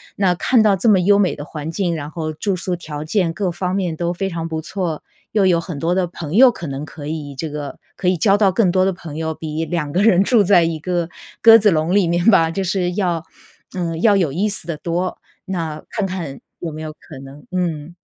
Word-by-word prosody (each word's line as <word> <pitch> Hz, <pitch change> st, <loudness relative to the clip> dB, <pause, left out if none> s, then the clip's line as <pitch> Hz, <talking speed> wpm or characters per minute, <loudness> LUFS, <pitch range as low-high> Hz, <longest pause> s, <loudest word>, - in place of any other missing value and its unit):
那 185 Hz, -3 st, +2 dB
看 235 Hz, +5 st, +3 dB
到 210 Hz, -2 st, +4 dB
这 230 Hz, -, 0 dB
么 200 Hz, -4 st, +6 dB
优 200 Hz, +3 st, +4 dB
美 190 Hz, -, +2 dB
的 -, -, -7 dB
环 150 Hz, +1 st, -6 dB
境， 170 Hz, 0 st, -1 dB
然 150 Hz, +1 st, -6 dB
后 155 Hz, -1 st, -4 dB
住 190 Hz, +5 st, -2 dB
宿 180 Hz, 0 st, -3 dB
条 150 Hz, -3 st, -6 dB
件 165 Hz, 0 st, 0 dB
各 190 Hz, -2 st, -1 dB
方 180 Hz, +2 st, -2 dB
面 180 Hz, -5 st, -1 dB
都 175 Hz, 0 st, -1 dB
非 195 Hz, +2 st, -2 dB
常 165 Hz, -2 st, -4 dB
不 160 Hz, -1 st, -3 dB
错， 175 Hz, -3 st, -4 dB, 0.3 s
又 205 Hz, -3 st, +3 dB
有 175 Hz, -2 st, +4 dB
很 165 Hz, -2 st, -6 dB
多 165 Hz, +4 st, 0 dB
的 180 Hz, -1 st, +1 dB
朋 165 Hz, -1 st, -6 dB
友 255 Hz, +2 st, +8 dB
可 175 Hz, -, -6 dB
能 140 Hz, 0 st, -5 dB
可 145 Hz, -2 st, -9 dB
以 150 Hz, -3 st, -5 dB
这 160 Hz, +1 st, -3 dB
个 145 Hz, -1 st, -6 dB, 0.2 s
可 180 Hz, -, -2 dB
以 185 Hz, -, +4 dB
交 195 Hz, +4 st, +3 dB
到 195 Hz, -3 st, +3 dB
更 190 Hz, -3 st, +3 dB
多 185 Hz, 0 st, +3 dB
的 195 Hz, -, +1 dB
朋 160 Hz, -4 st, -9 dB
友， 160 Hz, 0 st, -2 dB
比 160 Hz, +1 st, -4 dB
两 160 Hz, -4 st, -2 dB
个 180 Hz, -, +1 dB
人 200 Hz, -3 st, +5 dB
住 235 Hz, 0 st, +4 dB
在 180 Hz, -3 st, +5 dB
一 165 Hz, -1 st, -1 dB
个 175 Hz, 0 st, -2 dB, 0.3 s
鸽 225 Hz, 0 st, +9 dB
子 210 Hz, -2 st, +4 dB
笼 160 Hz, +2 st, +1 dB
里 195 Hz, -4 st, +3 dB
面 170 Hz, +1 st, 0 dB
吧， 165 Hz, -7 st, +5 dB
就 195 Hz, +4 st, -2 dB
是 180 Hz, -1 st, -1 dB
要 175 Hz, -4 st, 0 dB, 0.5 s
嗯， 165 Hz, -2 st, -3 dB
要 210 Hz, -2 st, +5 dB
有 175 Hz, -8 st, +1 dB
意 195 Hz, +8 st, 0 dB
思 200 Hz, -, -3 dB
得 165 Hz, -2 st, -4 dB
多， 175 Hz, +3 st, -2 dB, 0.3 s
那 165 Hz, -5 st, -4 dB
看 210 Hz, -, -2 dB
看 165 Hz, -8 st, -5 dB, 0.2 s
有 165 Hz, -2 st, -4 dB
没 155 Hz, +1 st, -7 dB
有 155 Hz, -1 st, -6 dB
可 150 Hz, -3 st, -13 dB
能 135 Hz, +2 st, -12 dB
嗯。 170 Hz, -3 st, -2 dB
175 Hz, 260 characters per minute, -19 LUFS, 160-190 Hz, 0.5 s, 鸽